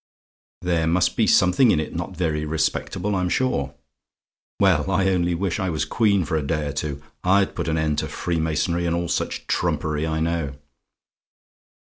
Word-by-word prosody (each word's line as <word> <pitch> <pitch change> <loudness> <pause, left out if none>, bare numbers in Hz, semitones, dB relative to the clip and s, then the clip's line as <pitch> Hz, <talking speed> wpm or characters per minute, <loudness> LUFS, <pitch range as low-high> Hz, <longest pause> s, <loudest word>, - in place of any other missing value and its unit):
There 85 -2 +1
must 85 +2 +2
be 110 - +2
something 95 +9 +5
in 75 - +3
it 75 - -4
not 85 +1 -5
very 80 -4 0
respectable, 90 +5 -1
I'm 90 -1 0
sure. 70 - 0 0.8
Well, - - +3
I 95 0 +2
only 90 -2 +1
wish 90 +1 -1
I 95 -2 -1
was 80 -2 -1
Queen 100 -6 +2
for 80 - -2
a 80 - +1
day 75 +1 -1
or 70 - -3
two. 75 -1 -4 0.2
I'd 95 +2 +3
put 85 - -3
an 80 0 0
end 80 -1 0
to - - -2
freemasonry, 85 0 -1
and 85 - +1
all 85 0 -2
such - - -2
trumpery, 75 0 -1
I 80 0 -1
know. 80 -4 -1
85 Hz, 175 wpm, -23 LUFS, 80-90 Hz, 0.8 s, something